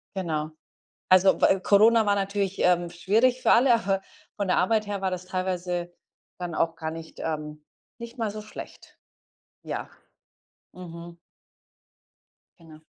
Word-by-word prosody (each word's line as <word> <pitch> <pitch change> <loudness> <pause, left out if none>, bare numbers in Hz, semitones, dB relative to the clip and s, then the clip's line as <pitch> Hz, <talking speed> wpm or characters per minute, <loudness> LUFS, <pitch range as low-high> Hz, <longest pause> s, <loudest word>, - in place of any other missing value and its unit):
Genau. 155 -5 -2 0.6
Also, 185 +1 +5
wä 190 - +4
Corona 220 +3 +5
war 205 - +3
natürlich, 200 -1 -2
ähm, 175 -1 +2
schwierig 225 +8 +1
für - - +4
alle, 240 +1 +5
aber 195 -4 0 0.3
von 200 -2 -2
der - - +2
Arbeit 215 +3 +1
her 200 -1 -3
war 190 -1 -1
das 185 0 -5
teilweise 180 -1 -3 0.5
dann 175 -2 -5
auch 165 0 0
gar 160 -1 -4
nicht, 165 0 -10
ähm 150 -1 -5 0.4
nicht 235 +1 -9
mal 220 -2 -1
so 215 0 -7
schlecht. 215 - -11 0.7
Ja. - - -5 0.8
Mhm. 170 -1 -10 1.4
Genau. 155 -2 -15
185 Hz, 140 wpm, -26 LUFS, 170-205 Hz, 1.4 s, Also